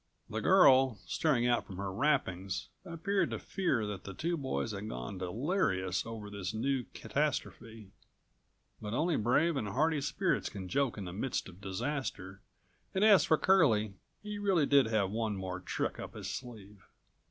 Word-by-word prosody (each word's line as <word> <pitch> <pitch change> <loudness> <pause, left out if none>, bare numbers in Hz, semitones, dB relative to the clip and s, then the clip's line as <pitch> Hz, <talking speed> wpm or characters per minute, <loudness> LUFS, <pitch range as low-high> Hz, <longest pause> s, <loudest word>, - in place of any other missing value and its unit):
The - - -2
girl, 130 -2 +6
staring 135 -7 +1
out 120 -1 +1
from 95 -4 -8
her 100 -1 -4
wrappings, 95 -8 0
appeared 185 +4 -1
to - - -3
fear 170 - -1
that 105 -2 -5
the 95 - -8
two 170 - -1
boys 130 -6 -2
had 100 +1 -5
gone 60 +10 -6
delirious 95 - -1
over 110 -2 -6
this 100 0 -4
new 130 +3 0
catastrophe. 115 -7 -3 0.9
But 105 +1 -4
only 165 +4 +1
brave 145 +9 +2
and 115 -6 -2
hardy 150 +7 +1
spirits 175 +6 0
can 95 -3 -7
joke 135 +3 0
in216 100 - -5
the 90 - -6
midst 130 -6 -2
of 90 +1 -15
disaster, 100 -2 -4 0.5
and 195 +3 +4
as 205 -3 +7
for 155 - +4
Curlie, 115 - +3 0.3
he 210 -1 -5
really 190 -7 +3
did 140 -4 +5
have 105 -4 +1
one 110 -1 -1
more 95 -1 -4
trick 90 - -3
up - - -7
his - - -5
sleeve. 105 -6 -8
115 Hz, 165 wpm, -32 LUFS, 100-150 Hz, 0.9 s, as